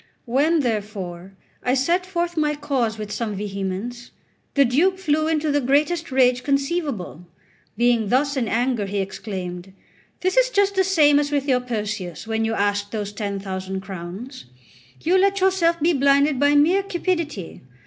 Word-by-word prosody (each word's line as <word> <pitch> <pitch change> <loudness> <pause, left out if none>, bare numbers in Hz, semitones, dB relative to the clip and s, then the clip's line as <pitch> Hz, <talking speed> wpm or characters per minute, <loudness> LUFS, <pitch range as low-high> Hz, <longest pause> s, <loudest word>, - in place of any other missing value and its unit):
When, 295 +7 +2
therefore, 200 -6 -4 0.3
I 250 +1 +1
set 345 +8 +1
forth 345 -2 -2
my 300 -2 +1
cause 260 -7 -1
with 215 -1 -6
some 220 -3 -3
vehemence, 200 +4 -4 0.5
the 280 -1 +5
Duke 335 +10 +2
flew 310 -4 0
into 310 -1 0
the 290 0 +2
greatest 300 +5 +1
rage 255 -1 +3
conceivable. 275 - -2 0.5
Being 235 -3 +2
thus 280 +4 +2
in 250 -4 0
anger, 235 -2 0
he 200 +1 -3
exclaimed: 190 -2 -5 0.5
"This 370 +5 0
is - - +5
just 405 -4 +2
the 380 -1 +3
same 305 -6 +4
as 290 0 -1
with 285 -1 0
your 255 -2 +3
Perseus, 210 -8 -4
when 225 0 -1
you 225 0 -1
asked 205 0 0
those 210 -2 -4
ten 200 -1 -3
thousand 190 0 -5
crowns. 190 - -8 0.6
You 365 +3 +3
let 395 +1 +2
yourself 365 -3 +2
be 330 +3 +3
blinded 280 0 +3
by 285 +1 +4
mere 335 +7 +4
cupidity. 340 - -3
260 Hz, 160 wpm, -22 LUFS, 205-310 Hz, 0.6 s, the